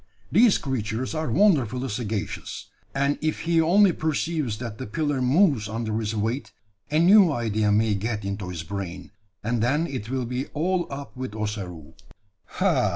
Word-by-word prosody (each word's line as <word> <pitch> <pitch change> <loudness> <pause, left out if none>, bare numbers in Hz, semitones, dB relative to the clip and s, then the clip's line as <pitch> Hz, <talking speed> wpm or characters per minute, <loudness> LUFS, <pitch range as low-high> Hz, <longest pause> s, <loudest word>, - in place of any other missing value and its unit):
These 220 +3 +5
creatures 125 -1 -3
are 155 -1 -2
wonderfully 135 - +3
sagacious; 105 -2 -4 0.2
and 140 +1 +1
if 155 0 -1
he 165 -1 +2
only 190 +4 +5
perceives 155 -6 -1
that 115 -2 -6
the 130 - -5
pillar 145 +4 -1
moves 130 - +3
under 110 0 -2
his 110 0 -2
weight, 115 +6 -2 0.4
a 150 - +1
new 185 +1 +7
idea 110 -5 0
may 110 +1 +3
get 105 +1 -2
into 100 -1 -4
his 85 -3 -5
brain, 95 -1 -6 0.3
and 115 +1 0
then 145 +8 +2
it 130 -8 -5
will 130 -1 -1
be 125 +3 -3
all 175 +3 0
up 140 0 -7
with 130 -4 -5
Ossaroo." 95 -7 -5 0.5
"Ha! - - +1
125 Hz, 160 wpm, -25 LUFS, 105-155 Hz, 0.5 s, new